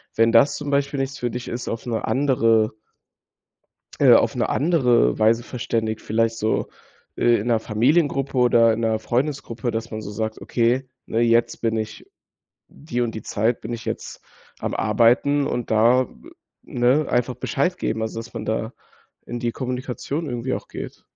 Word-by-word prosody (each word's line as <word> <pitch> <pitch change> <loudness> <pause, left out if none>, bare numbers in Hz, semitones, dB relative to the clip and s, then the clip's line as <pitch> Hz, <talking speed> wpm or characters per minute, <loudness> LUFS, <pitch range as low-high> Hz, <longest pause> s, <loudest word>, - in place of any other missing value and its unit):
wenn 115 0 +4
das 115 +5 +5
zum 145 -1 -5
Beispiel 140 0 0
nichts 135 0 -3
für 120 - -1
dich 125 +1 -6
ist, 120 +1 -5
auf 115 - -4
'ne 115 -2 -2
andere 115 -5 +2 1.3
äh, - - +8
auf - - +4
'ne - - 0
andere 135 -9 +2
Weise 115 +2 +3
verständigt, 115 -3 -3
vielleicht 115 +1 0
so, 110 0 -1 0.5
äh, 120 -1 +3
in 110 - -5
'ner 115 -2 +3
Familiengruppe 135 +5 +1
oder 120 -2 +5
in 110 - -3
'ner 110 -1 +1
Freundesgruppe, 120 -1 -2
dass 115 +1 -4
man 110 0 -4
so 105 - -7
sagt: 110 +1 -4
„Okay, 125 +3 0 0.2
ne, 115 - -1
jetzt 115 0 +2
bin 115 -1 0
ich 110 0 -5 0.6
die 125 -5 -4
und 115 -2 -2
die 110 - -5
Zeit, 110 +3 0
bin 115 +2 -5
ich 115 - -8
jetzt - - -6 0.4
am - - -3
Arbeiten“, 120 +6 +3
und 120 -4 -3
da, 120 +4 +4 0.5
ne, 125 +5 +1
einfach 125 +1 0
Bescheid 180 +7 -1
geben, 110 - -2
also 110 0 -3
dass 115 +1 -8
man - - -6
da - - -2 0.5
in 120 - -5
die 120 -1 -1
Kommunikation 130 +5 -4
irgendwie 125 0 -2
auch - - -7
geht. - - -8
120 Hz, 175 wpm, -22 LUFS, 115-130 Hz, 1.3 s, äh